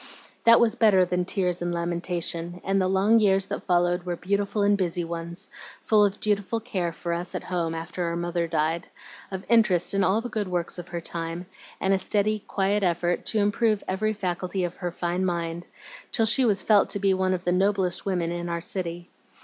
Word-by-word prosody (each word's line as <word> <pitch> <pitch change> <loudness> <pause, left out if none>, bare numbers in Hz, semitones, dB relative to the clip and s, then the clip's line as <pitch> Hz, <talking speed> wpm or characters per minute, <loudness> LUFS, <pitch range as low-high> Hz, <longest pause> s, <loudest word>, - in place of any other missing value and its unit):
"That 230 0 +8
was 230 -2 +3
better 210 -6 +4
than 180 0 -1
tears 180 -2 -1
and 175 0 -1
lamentation, 170 0 -3
and 195 0 +1
the 185 - +2
long 195 +4 +4
years 195 -2 +3
that - - -6
followed 175 0 +2
were 175 -1 -3
beautiful 200 +3 -1
and 205 0 +4
busy 180 -3 -1
ones, 170 +1 -5 0.3
full 215 -1 +3
of 205 0 0
dutiful 210 +1 0
care 190 -7 -2
for 170 +1 -4
us 175 +2 -4
at - - -3
home 170 -3 -2
after 170 +2 -4
our 170 0 -2
mother 170 0 -1
died, 160 +1 -1 0.4
of 190 -1 -6
interest 210 -7 +4
in 195 0 +2
all 190 +4 +3
the 235 - -4
good 215 -4 -3
works 175 -1 -2
of 175 - -8
her 170 -1 -5
time, 165 +1 -5 0.3
and 190 - +2
a 190 - +2
steady, 210 +2 +1
quiet 200 +1 +1
effort 175 -1 0
to 220 - +2
improve 210 +1 +1
every 215 +3 0
faculty 185 -1 -2
of 175 0 -4
her 180 - -3
fine 175 +1 -2
mind, 170 -1 -2 0.4
till 225 - +3
she 255 +4 +4
was 205 -4 +2
felt 210 -2 +4
to 200 - -1
be 195 -1 +3
one 185 0 +1
of 180 - -6
the 175 - +2
noblest 190 -1 +1
women 175 -4 -1
in 175 0 -4
our 170 0 -2
city. 175 -1 -4
185 Hz, 205 wpm, -26 LUFS, 175-200 Hz, 0.4 s, That